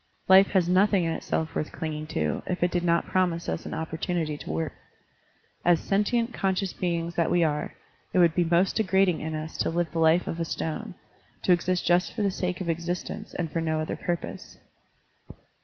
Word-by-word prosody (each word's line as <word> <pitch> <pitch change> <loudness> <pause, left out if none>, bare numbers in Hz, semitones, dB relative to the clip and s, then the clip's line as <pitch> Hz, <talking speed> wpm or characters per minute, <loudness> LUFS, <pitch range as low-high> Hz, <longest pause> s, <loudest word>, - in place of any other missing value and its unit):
Life 190 +1 +8
has 185 -3 +3
nothing 190 +1 +4
in 165 - 0
itself 160 0 -2
worth 155 - -3
clinging 155 -1 -4
to, 75 - -1
if 180 -1 -1
it 175 - +2
did 175 -1 0
not 170 -1 +2
promise 175 -2 0
us 80 - -3
an - - -4
opportunity 160 -1 -2
to 145 - -9
work. 80 +2 -2 0.9
As 175 -2 +4
sentient, 230 +4 0
conscious 190 -1 -1
beings 170 -1 -2
that 170 0 +1
we 175 -1 +3
are, 150 -2 -1 0.4
it - - -1
would 170 -3 +5
be 175 - +2
most 175 +3 +2
degrading 190 -4 +2
in 160 0 -3
us 155 +1 -5
to - - 0
live 170 -1 -1
the 165 - -2
life 160 +2 +4
of 165 - -4
a - - +1
stone, 160 -1 -4 0.5
to - - +3
exist 180 +1 0
just 175 +1 +2
for 220 - -1
the 200 - +2
sake 180 0 -3
of 185 - -4
existence 170 +2 -3
and 165 -3 -3
for 165 - -1
no 160 -1 0
other 155 - -2
purpose. 175 -2 -5
170 Hz, 200 wpm, -27 LUFS, 160-185 Hz, 0.9 s, Life